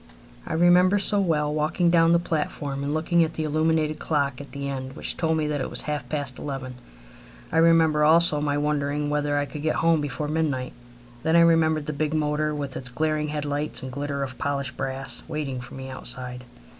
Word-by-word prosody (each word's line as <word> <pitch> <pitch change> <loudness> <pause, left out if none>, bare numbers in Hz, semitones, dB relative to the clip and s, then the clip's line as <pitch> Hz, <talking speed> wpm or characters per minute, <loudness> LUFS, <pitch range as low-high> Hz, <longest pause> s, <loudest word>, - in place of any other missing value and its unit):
I - - -3
remember 180 +3 +5
so 205 +1 +1
well 150 -6 +1
walking 165 +3 +1
down 165 -1 +5
the 170 - +6
platform 150 -4 -3
and 140 - -2
looking 165 +2 +2
at 160 0 -3
the 160 - -2
illuminated 155 0 +1
clock 140 -4 -1
at 140 - -11
the 140 0 -4
end 130 -1 -5
which - - -1
told 160 -1 0
me 155 - 0
that 150 -2 -1
it - - -3
was - - 0
half 145 -5 -4
past 140 -4 -3
eleven. 135 -3 -5 0.8
I - - 0
remember 165 -2 +4
also 155 -1 +5
my 145 -1 0
wondering 145 0 -1
whether 145 0 0
I 145 - +1
could 150 +1 -8
get 155 +1 0
home 165 -2 +3
before 145 +1 -3
midnight. 150 -5 -1 0.5
Then 160 +4 +1
I 170 - +7
remember 160 -2 +4
the 150 +1 -4
big 155 +2 -1
motor, 150 0 0
with 140 -2 -4
its 130 -1 -4
glaring 155 +3 -1
head 150 -1 -3
lights 145 0 -2
and 130 - -5
glitter 140 +1 -3
of 130 -2 -6
polished 140 -2 -2
brass, 135 +1 -3
waiting 135 -4 -3
for 125 - -10
me 130 0 -7
outside. 125 -1 -5
150 Hz, 205 wpm, -25 LUFS, 140-160 Hz, 0.8 s, I